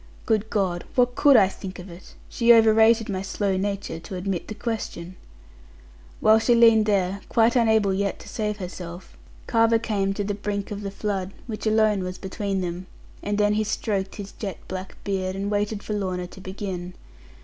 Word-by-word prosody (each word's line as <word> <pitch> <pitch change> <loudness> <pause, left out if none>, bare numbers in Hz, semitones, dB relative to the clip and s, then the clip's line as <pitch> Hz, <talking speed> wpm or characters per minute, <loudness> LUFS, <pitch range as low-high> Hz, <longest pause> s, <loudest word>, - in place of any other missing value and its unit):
Good 220 -1 +1
God! 185 -4 -1
What 245 -1 +3
could 280 0 +6
I 195 -4 +6
think 190 -1 -8
of 180 - -9
it? 175 0 -13
She 235 0 +3
over 225 -2 +7
rated 225 0 +4
my 190 -2 -2
slow 195 0 -1
nature, 200 -3 -3
to 185 - -8
admit 185 -1 -3
the 215 - -6
question. 205 -6 -5 1.0
While 220 +1 +5
she 235 +2 +3
leaned 225 -2 +6
there, 195 -1 +1
quite 230 +1 +3
unable 220 -4 +3
yet 200 0 -1
to - - -12
save 210 -2 -3
herself, 180 -2 -8 0.3
Carver 230 0 +3
came 200 -4 -1
to 205 - -2
the 205 +1 -2
brink 200 0 -4
of 205 0 -4
the 200 - -4
flood, 195 -1 -3
which 220 -2 -5
alone 215 -2 +3
was 185 0 -5
between 195 0 -3
them; 180 +1 -4 0.3
and 205 0 -2
then 210 0 +3
he 215 +1 +1
stroked 200 -2 -2
his 200 -1 -7
jet 200 -4 -6
black 185 0 -6
beard, 190 -2 -2
and 200 +1 -3
waited 205 0 -1
for 215 - -4
Lorna 185 -3 -2
to 190 +2 -12
begin. 185 -2 -6
200 Hz, 190 wpm, -24 LUFS, 190-220 Hz, 1.0 s, over